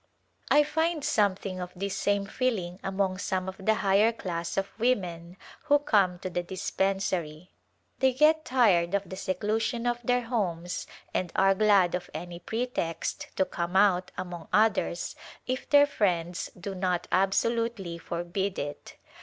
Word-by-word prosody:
I 295 - +6
find 320 +1 0
something 195 -2 +1
of 180 0 -5
this 195 +2 -3
same 200 0 +1
feeling 195 -6 -2
among 190 -1 -1
some 185 -1 -2
of 190 +1 -7
the 220 +2 +3
higher 200 +4 +5
class 170 -6 -4
of 195 0 -1
women 180 -7 -1 0.3
who 290 -1 +5
come 205 -11 +2
to 185 - -3
the 175 - -1
dispen 190 +2 -1
sary. 175 -3 -3 0.5
They 265 -1 +4
get 310 +4 +4
tired 200 - +3
of 200 -1 -1
the 190 - -7
seclusion 215 +6 -1
of 240 0 0
their 245 +1 +2
homes 180 -7 -2 0.3
and 180 -2 -1
are 195 0 +5
glad 195 -3 +4
of 180 0 -3
any 175 0 -6
pretext 225 -4 -3
to 190 - +2
come 175 +1 -4
out 190 -2 +4
among 175 -2 -6
others 210 -5 +1 0.3
if 255 0 -3
their 285 0 +7
friends 180 -10 -1
do 195 +2 -5
not 180 -2 -1
absolutely 195 -1 0
forbid 175 +4 -3
it. 145 0 -6
195 Hz, 155 wpm, -28 LUFS, 180-225 Hz, 0.5 s, their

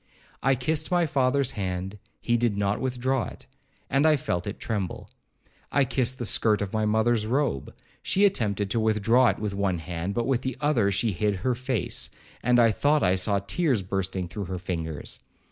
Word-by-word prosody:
I 135 - +3
kissed 145 +5 0
my 175 -1 +3
father's 140 -3 +1
hand,—he 95 +4 -3
did 115 -3 +1
not 100 0 0
withdraw 130 0 0
it, - - -12 0.4
and 140 +4 +3
I 155 - +5
felt 90 -10 -2
it 100 - -5
tremble. 100 -6 -4 0.6
I 140 -1 +3
kissed 130 0 -1
the 120 - -3
skirt 105 -1 +3
of 100 -2 -4
my 110 -1 +1
mother's 110 0 +2
robe,—she 135 - -1
attempted 105 - 0
to 115 - +1
withdraw 110 +3 +3
it - - -1
with 105 -2 -3
one 100 -2 0
hand, 85 +3 -4
but 120 -1 0
with 130 -3 +1
the 130 -2 -4
other 145 -9 +2
she 100 +3 +1
hid 105 +2 0
her 130 - +3
face, 125 -4 -2 0.3
and 125 0 +3
I 115 -1 +6
thought 145 +7 +2
I 90 - +4
saw 95 +2 +1
tears 130 - +1
bursting 95 -1 -2
through 100 +4 -5
her 95 +1 -4
fingers. 80 -4 -4
110 Hz, 180 wpm, -26 LUFS, 100-130 Hz, 0.6 s, I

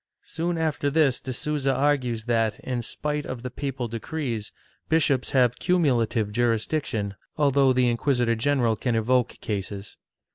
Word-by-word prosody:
^ - - -23
Soon 170 +1 -2
after 155 -3 0
this 140 -3 +3
de 130 - -5
Sousa 140 +1 -1
argues 130 -5 +1
that, 115 -2 +1
in 125 -2 -2
spite 150 +5 -3
of 130 -3 -6
the 125 - -4
papal 135 -2 -3
decrees, 115 -1 -4 0.4
bishops 145 -5 +2
have 125 -3 +2
cumulative 125 - +2
jm'isdiction, 115 -2 0 0.2
although 140 -2 +4
the 125 -1 +3
inquisitor 120 0 +1
general 120 -1 +1
can 120 +2 -1
evoke 120 +2 +1
cases. 100 -1 -4
125 Hz, 145 wpm, -25 LUFS, 115-145 Hz, 0.4 s, although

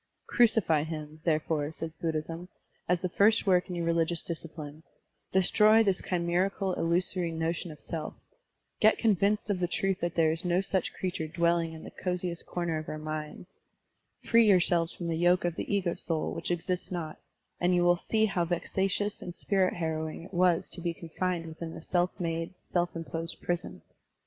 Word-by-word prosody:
"Crucify 220 -10 +3
him," 155 0 -6
therefore, 155 -2 0
says 160 0 -6
Buddhism, 165 +2 -4 0.4
"as 180 0 +1
the 180 - 0
first 215 +5 +4
work 185 -1 +3
in 180 - -3
your 170 -1 -2
religious 170 0 +1
discipline; 155 -2 -7 0.5
destroy 215 +4 +5
this 195 -4 +1
chimerical, 180 +2 0
illu 170 +2 +2
sory 180 -2 +2
notion 165 +1 -2
of 150 -2 -10
self; 160 -2 -5 0.6
get 215 +1 +5
convinced 210 -1 +2
of 190 - -1
the 175 - +1
truth 195 +2 0
that 175 -1 -2
there 160 -2 +4
is 165 +1 -3
no 175 0 +2
such 190 -1 0
creature 180 -4 -3
dwelling 170 0 +1
in 160 - -10
the - - -9
coziest 180 -1 -2
comer 170 -3 -2
of 155 - -7
our 155 - -4
minds; 155 +4 -6 0.6
free 230 -1 +5
yourselves 175 -3 +4
from 170 - -6
the 165 - 0
yoke 175 +1 +3
of 175 - 0
the - - -4
ego 190 -4 +1
soul 160 -2 -2
which - - -4
exists 175 +2 -1
not; 165 -4 -4 0.4
and 180 +1 +3
you 175 - +3
will 175 0 +5
see 220 +5 +1
how 190 -4 0
vexatious 190 +4 -1
and 175 -1 -7
spirit 190 -2 +1
harrowing 160 -1 -3
it 185 - -13
was 175 -1 +3
to 175 - -2
be 170 -1 -2
confined 170 +1 -3
within 165 0 -7
the - - -7
self 175 +1 +1
made, 165 +1 -3
self 175 -1 -1
imposed 165 0 -4
prison. 175 0 -3
175 Hz, 180 wpm, -29 LUFS, 165-185 Hz, 0.6 s, destroy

